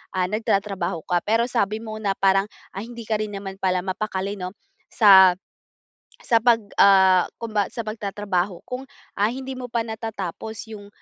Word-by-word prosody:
ah, 185 -1 +1
nagtatrabaho 195 -6 -1
ka. 175 - +2
Pero 225 +2 +3
sabi 215 -3 0
mo 215 -1 -6
na 200 -2 0
parang, 195 +1 +3 0.3
ah, - - -5
hindi 235 0 -9
ka 215 -2 0
rin 210 -1 -4
naman 195 -1 -7
pala 185 -2 0
mapakali, 195 +1 -3
'no, 180 0 -5 0.4
sa 190 -4 +7 0.9
sa 230 - +3
pag 235 -2 +5 0.2
ah, 190 -2 +6
kumba 215 -4 -1
sa 230 - -4
pagtatrabaho 200 -4 -2
kung, 255 +1 -5 0.3
ah, 205 +2 +3
hindi 265 +1 -6
mo 250 -1 -6
pa 235 -1 0
natatapos 220 -1 -6
'yong, 205 -2 -9
205 Hz, 165 wpm, -23 LUFS, 190-225 Hz, 0.9 s, sa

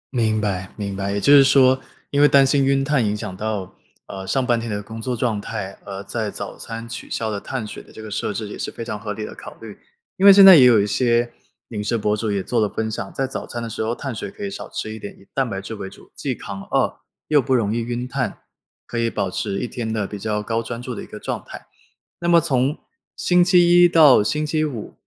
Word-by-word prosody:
明 110 -2 +1
白， 95 -3 -2
明 100 -2 -4
白， 100 0 -2
也 100 - -1
就 140 +8 +5
是 140 -1 +9
说， 130 -1 +4 0.3
因 140 0 +2
为 145 - +8
担 140 -1 +5
心 140 +1 +2
晕 135 0 +2
碳 140 -4 +1
影 105 0 0
响 95 - -6
到， 105 -2 -4 0.3
呃， 95 -1 -8
上 130 +5 0
半 120 -2 +2
天 115 - -5
的 105 -1 -2
工 110 +1 -8
作 125 +1 -2
状 115 -3 -1
态， 100 -3 -5
而 100 0 -6
在 110 +1 -3
早 - - -6
餐 115 0 -7
取 120 - -8
消 110 -1 -2
的 100 - -3
碳 125 -5 -4
水 - - -8
的 - - -18
这 - - -13
个 110 -1 -8
设 105 - -2
置 105 +1 -4
也 - - -7
是 - - -3
非 115 - -7
常 105 -3 -5
合 105 0 -4
理 105 +1 -5
的 - - -8
考 - - -11
虑。 - - -10 0.4
因 190 - -2
为 - - +12
现 195 0 +9
在 190 -2 +11
也 130 -4 +8
有 120 -3 +6
一 100 - +2
些， 120 +1 +1 0.4
饮 105 -3 -4
食 115 +2 0
博 105 -1 0
主 105 0 -2
也 100 -2 -1
做 120 -3 0
了 105 - +1
分 110 +1 -3
享， 95 -3 -5
在 135 - -2
早 135 - -5
餐 120 -1 -5
的 115 - -4
时 110 - -5
候 115 +2 -1
碳 135 -3 -5
水 160 - -5
可 205 0 -7
以 195 - -4
少 - - -7
吃 110 - -5
一 110 - -8
点， 100 - -8
以 100 - -19
蛋 135 -3 0
白 95 -1 -4
质 100 +3 -7
为 100 -2 -6
主， - - -17
既 135 -3 -3
扛 100 -3 -7
饿 - - -1 0.3
又 150 -2 +5
不 130 0 +1
容 110 -3 +1
易 - - 0
晕 120 +1 -3
碳， 125 - -3 0.5
可 120 - -4
以 115 0 +1
保 100 -4 -2
持 100 - -3
一 - - -2
天 120 -3 -4
的 110 -2 -1
比 105 +1 -7
较 105 0 -2
高 115 +1 -1
专 115 0 -6
注 125 0 -6
的 - - -6
一 - - -10
个 - - -9
状 - - -4
态。 - - -11 0.5
那 170 - -1
么 170 -1 +7
从 140 -2 0 0.4
星 180 0 +3
期 175 -1 +5
一 175 - +7
到 150 -10 +6
星 150 +7 -1
期 155 +1 0
五， 130 -9 -5
115 Hz, 290 characters per minute, -21 LUFS, 105-135 Hz, 0.5 s, 为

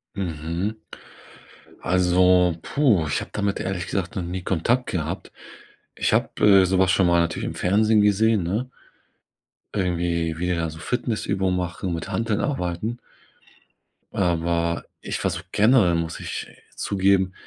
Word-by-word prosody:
Mhm. 90 +3 -3 1.0
Also, 90 -1 +3
puh, 115 - +2
ich 70 - -1
habe - - -8
damit 100 -1 -1
ehrlich 90 -3 -3
gesagt 95 +3 -3
noch 90 - -1
nie 90 +2 -4
Kontakt 105 +9 0
gehabt. 85 +2 -4 0.6
Ich - - 0
habe, - - +2 0.3
äh, - - +3
sowas 95 0 +3
schon 95 -1 +3
mal 85 0 +4
natürlich 85 -1 -2
im - - -5
Fernsehen 105 +3 +3
gesehen, 105 -1 +3
ne? 105 +9 -2 1.0
Irgendwie, 85 -4 -1
wie 90 - -1
die 90 - +1
da 85 -1 -1
so 80 - -11
Fitnessübungen 105 -6 -1
machen, 90 0 -3
mit 80 - -5
Hanteln 110 -2 -1
arbeiten. 110 - -2 1.2
Aber 85 -1 0 0.2
ich - - -4
war 95 - +1
so 90 - -4
generell 105 -5 +4
muss 85 -1 -3
ich - - -5 0.3
zugeben. 95 -1 +1
90 Hz, 140 wpm, -23 LUFS, 85-105 Hz, 1.2 s, mal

